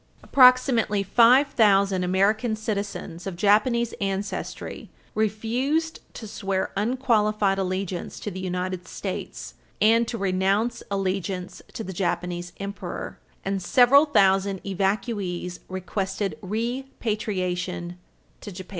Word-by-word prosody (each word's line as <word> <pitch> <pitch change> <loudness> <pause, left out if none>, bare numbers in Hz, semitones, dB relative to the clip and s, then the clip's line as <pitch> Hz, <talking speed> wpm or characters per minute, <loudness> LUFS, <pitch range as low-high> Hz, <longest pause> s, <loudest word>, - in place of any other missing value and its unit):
Approximately 250 -5 +5
five 240 +8 +5
thousand 200 -5 +3
American 210 +5 +2
citizens 200 -5 -4
of 190 - -4
Japanese 220 +5 +2
ancestry 195 +1 -4 0.2
refused 240 +10 -1 0.2
to 225 - -7
swear 195 -2 -2
unqualified 215 -3 +1
allegiance 185 -1 -3
to 210 - -4
the 185 - -6
United 185 0 -3
States - - -6 0.3
and 230 +2 +4
to 230 - -3
renounce 195 +4 0
allegiance 190 -2 -3
to 225 - -5
the 190 - -6
Japanese 175 -1 -2
Emperor, 200 0 -6 0.3
and 195 0 -1
several 255 - +5
thousand 195 -6 +3
evacuees 195 -2 -2
requested 190 0 -3
repatriation 205 -6 -3 0.4
to 205 - -8
Japan. 185 0 -9
200 Hz, 105 wpm, -25 LUFS, 185-225 Hz, 0.4 s, Approximately